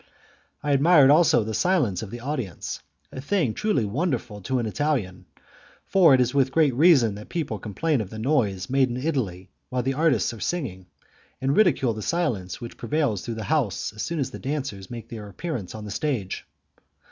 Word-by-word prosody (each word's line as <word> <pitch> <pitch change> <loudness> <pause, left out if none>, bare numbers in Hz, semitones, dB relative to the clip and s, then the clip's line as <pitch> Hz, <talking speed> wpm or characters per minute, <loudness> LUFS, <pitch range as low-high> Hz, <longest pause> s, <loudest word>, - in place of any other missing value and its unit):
I 145 - 0
admired 145 0 +6
also 150 -7 +5
the 110 +1 -4
silence 145 - +1
of 110 - -6
the 120 +3 -7
audience, 125 - -4 0.3
a 130 - -6
thing 145 - 0
truly 210 - 0
wonderful 120 - -2
to 130 +7 -1
an 120 - -1
Italian, 105 -8 -2 0.6
for 175 -8 +6
it - - +2
is 125 -1 +2
with 135 -2 +2
great 150 -3 +3
reason 135 - +5
that 105 +1 -10
people 145 -11 -3
complain 130 - -1
of 100 - -6
the 110 - -8
noise 110 -7 0
made 135 0 +2
in 120 - -3
Italy 125 - -2 0.2
while 125 -1 -1
the 135 +2 0
artists 140 -6 +2
are 115 - -9
singing, 110 - -3 0.5
and 135 +2 0
ridicule 135 - +3
the 110 - -6
silence 115 - -1
which 120 - -8
prevails 145 - 0
through 115 - -5
the 110 - -5
house 140 - -1
as 110 - -7
soon 170 - -3
as 135 -3 -1
the - - -8
dancers 130 -10 -4
make 115 -2 -7
their 105 -3 -7
appearance 120 - -5
on 110 -1 -7
the 105 - -6
stage. 115 -6 -3
130 Hz, 195 wpm, -25 LUFS, 105-150 Hz, 0.6 s, admired